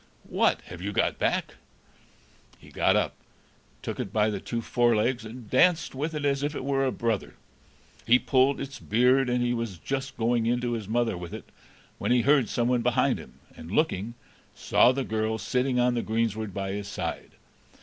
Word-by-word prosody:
"What! - - +2
have 90 -1 -10
you 100 +2 -3
got - - 0
back?" - - -1 1.0
He - - -17
got - - +2
up, - - +1 0.7
took - - -5
it 95 - -4
by 110 0 +2
the 100 - -3
two 115 - -4
forelegs, 120 +1 +1
and 115 +1 -9
danced 165 - +3
with 150 +4 -3
it 150 -1 -2
as 140 -1 +1
if 145 +1 -2
it 130 - -4
were 135 -1 +1
a 130 - +1
brother; 115 -4 -2 0.7
he 120 +2 +7
pulled 130 +2 +2
its 135 0 -6
beard, 125 +4 +3
and 125 0 +1
he 120 0 +1
was 115 -6 -3
just 135 - -4
going 115 0 +1
in 120 +1 +2
to 120 -1 -1
his 110 -4 -3
mother 115 -1 0
with 85 -1 -7
it, - - -11 0.5
when - - -1
he 125 -1 +4
heard 140 -3 +4
someone 120 0 +1
behind 120 0 +2
him, - - -14
and, 80 - -10
looking, 115 - 0 0.4
saw 125 - +4
the 135 +1 -2
girl 110 -1 -1
sitting 125 +2 0
on 125 0 +3
the 120 - 0
greensward 110 -1 -1
by 95 +1 -3
his 100 0 -4
side. 100 - -5
120 Hz, 190 wpm, -27 LUFS, 110-130 Hz, 1.0 s, he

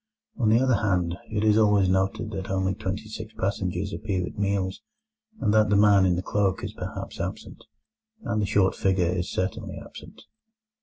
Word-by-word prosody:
On 115 -4 +3
the 115 +2 +5
other 130 -2 +3
hand, 90 -5 0
it 105 -1 -1
is 110 0 +4
always 105 -3 +4
noted 95 +4 0
that 95 -2 -5
only 95 0 0
twenty 100 +1 -4
six 110 0 -8
passengers 95 0 -2
appear 95 -4 -2
at - - -9
meals, 100 -2 -1 0.6
and 105 -4 +1
that 110 0 +4
the 105 - +3
man 100 -2 +5
in 90 - +2
the 90 - -3
cloak 100 -2 0
is - - -4
perhaps - - -7
absent, - - -6 0.6
and 110 -2 -1
the 100 - 0
short 95 -1 +3
figure 95 -2 +1
is 90 +1 -1
certainly 95 +1 -3
absent. - - -12
100 Hz, 185 wpm, -26 LUFS, 95-105 Hz, 0.6 s, the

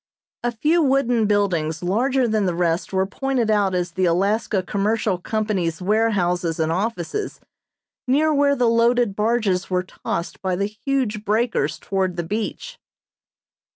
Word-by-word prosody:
A 240 - 0
few 305 +9 +2
wooden 260 -6 +2
buildings 175 -6 0
larger 250 +7 +1
than 215 -2 +1
the 175 - -1
rest 170 -1 0
were 190 0 +1
pointed 245 +2 -1
out 200 -3 +2
as 175 -1 -1
the 185 +2 0
Alaska 195 +3 +1
Commercial 205 0 0
Company's 190 -5 -1
warehouses 180 -5 +1
and 160 0 +1
offices, 200 - -3 0.7
near 305 +4 +3
where 285 -1 +3
the 245 -3 +2
loaded 230 -2 +2
barges 210 -4 0
were 180 -1 0
tossed 175 -2 -5
by 185 -1 -1
the 200 +2 0
huge 215 0 -2
breakers 220 +3 0
toward 190 -2 -2
the 175 - -2
beach. 220 - -4
210 Hz, 145 wpm, -22 LUFS, 180-235 Hz, 0.7 s, near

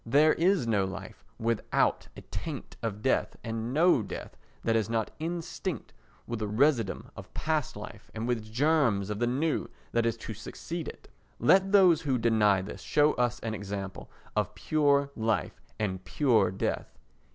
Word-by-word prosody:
There 145 +6 +5
is 180 -3 +2
no 105 -4 +2
life 95 0 -7
without 115 -1 +1
a - - -7
taint - - -6
of 105 -2 -4
death 130 - +1
and 115 +1 -3
no 160 -2 +4
death - - -7 0.3
that 115 - +2
is 110 -2 +1
not 115 -1 0
instinct 170 - -4 0.3
with 115 -2 -4
a 105 - -1
residuum 115 -1 +1
of - - -10
past 155 -3 -1
life - - -9
and 110 +2 -3
with 110 -3 -2
germs 120 -7 +2
of 105 - -3
the 120 - +2
new 145 +6 0 0.2
that 115 0 +2
is 115 0 0
to 110 - -6
succeed 160 - -6
it. - - -9 0.3
Let 190 +10 +4
those 185 -5 +6
who 135 -4 +1
deny 105 -4 +3
this 100 - -8
show 150 0 +3
us 120 0 0
an 115 -1 -3
example 100 -2 -5 0.3
of - - 0
pure 140 -2 +2
life 110 -1 -1 0.2
and 95 -3 -2
pure 110 0 +3
death. 95 - -3
115 Hz, 165 wpm, -29 LUFS, 110-150 Hz, 0.3 s, those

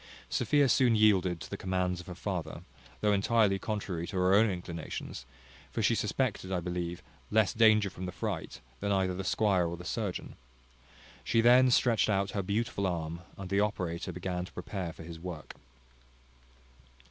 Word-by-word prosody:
Sophia 145 -2 +3
soon 125 -2 +4
yielded 95 -5 +3
to 75 - -8
the - - -5
commands 90 -1 -1
of - - -16
her 90 - -7
father, 85 - -4 0.4
though 105 - +3
entirely 100 -1 +3
contrary 95 -6 -3
to 100 - -7
her 90 +1 +3
own 110 +2 +5
inclinations, 85 -7 -6 0.4
for - - -2
she - - +4
suspected, 95 - -1
I 90 - +1
believe, 85 0 -4 0.3
less 110 -2 +3
danger 110 -2 +5
from 90 +2 -6
the - - -4
fright, - - -4 0.2
than 100 0 -1
either 95 -2 +1
the 95 +2 -4
squire 95 -2 +2
or 85 +1 -4
the 90 - -10
surgeon. 105 -4 -3 0.9
She 115 - +2
then 125 +3 +6
stretched 120 -3 +3
out 100 -1 +1
her 100 - -1
beautiful 100 0 -1
arm, 85 -2 -3 0.2
and 95 - -6
the 100 - +3
operator 90 -5 -1
began 90 0 -3
to - - -13
prepare 95 -5 -5
for 80 - -11
his 80 0 -9
work. 85 -3 -7
95 Hz, 170 wpm, -30 LUFS, 90-105 Hz, 0.9 s, then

